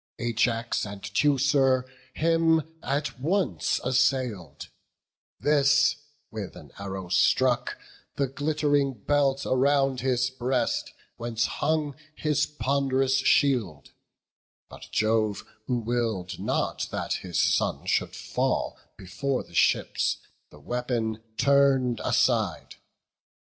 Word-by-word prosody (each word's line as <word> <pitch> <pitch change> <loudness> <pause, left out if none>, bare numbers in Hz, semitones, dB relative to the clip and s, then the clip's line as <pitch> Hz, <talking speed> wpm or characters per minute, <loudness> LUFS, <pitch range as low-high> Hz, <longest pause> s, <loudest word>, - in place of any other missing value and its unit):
Ajax 120 0 0
and 100 -1 -7
Teucer 135 +2 +2 0.3
him 165 0 +3 0.2
at 140 0 -2
once 180 +8 0
assail'd; 125 - 0 0.7
This 145 0 +3 0.4
with 105 -4 -6
an - - -13
arrow 95 -2 -6
struck 125 +6 +2 0.4
the 140 - 0
glitt'ring 145 0 0
belt 140 -2 +2
Around 135 0 +2
his 125 -1 +1
breast, 125 -1 -1 0.3
whence 115 -1 -1
hung 150 -2 -1 0.2
his 150 -2 0
pond'rous 135 -2 +1
shield; 125 - +1 0.8
But - - -11
Jove, 110 -1 +1 0.2
who 125 - 0
will'd 115 -6 -2
not - - -1
that - - -3
his 90 -3 -4
son - - +1
should - - 0
fall - - -2 0.2
Before 100 +9 -3
the - - -20
ships, - - +2 0.3
the 75 - -16
weapon 115 - -2 0.2
turn'd 135 -4 +3
aside. - - 0
130 Hz, 100 wpm, -26 LUFS, 115-140 Hz, 0.8 s, him